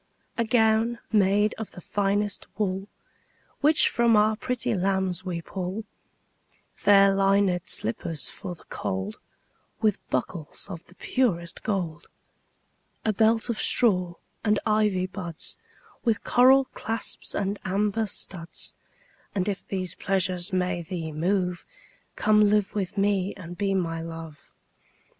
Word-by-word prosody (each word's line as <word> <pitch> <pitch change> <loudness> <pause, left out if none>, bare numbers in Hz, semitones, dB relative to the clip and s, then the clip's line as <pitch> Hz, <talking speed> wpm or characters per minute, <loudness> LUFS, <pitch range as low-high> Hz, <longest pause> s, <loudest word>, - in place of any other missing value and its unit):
A 235 - +1
gown 225 0 +3
made 205 0 +3
of 220 - -4
the - - -11
finest 205 +2 -1
wool 195 -2 -1 0.7
Which 300 +2 +5
from 235 -2 +4
our 215 +1 +4
pretty 250 +1 -2
lambs 190 -2 0
we 175 -3 -4
pull; 190 +5 -4 0.9
Fair 200 -1 +5
linèd 195 -2 +2
slippers 140 +6 -1
for 185 -3 -6
the - - -18
cold, 95 +3 -4 0.6
15 - - -44
With 215 -3 0
buckles 150 +5 -3
of 170 -2 -7
the 180 - -19
purest 175 -12 0
gold. 175 -6 -2 1.0
A 215 - +2
belt 220 +3 +3
of 235 -3 -2
straw 180 -7 +3 0.3
and 210 -1 +3
ivy 210 -4 +2
buds 180 -4 -5 0.4
With 230 -3 +1
coral 265 +2 +6
clasps 225 +1 -3
and 200 0 -1
amber 210 +3 0
studs: 175 -3 -5 0.6
And 190 -1 0
if 200 -2 -2
these 185 -3 -3
pleasures 185 -1 0
may 180 -1 0
thee 165 -1 -5
move, 180 +3 0 0.5
Come 215 0 +4
live 210 -1 +2
with 200 -1 -3
me 200 -1 +1
and 175 -3 -8
be 195 +1 0
my 165 -3 -1
Love. 165 -3 -9
195 Hz, 130 wpm, -26 LUFS, 180-215 Hz, 1.0 s, coral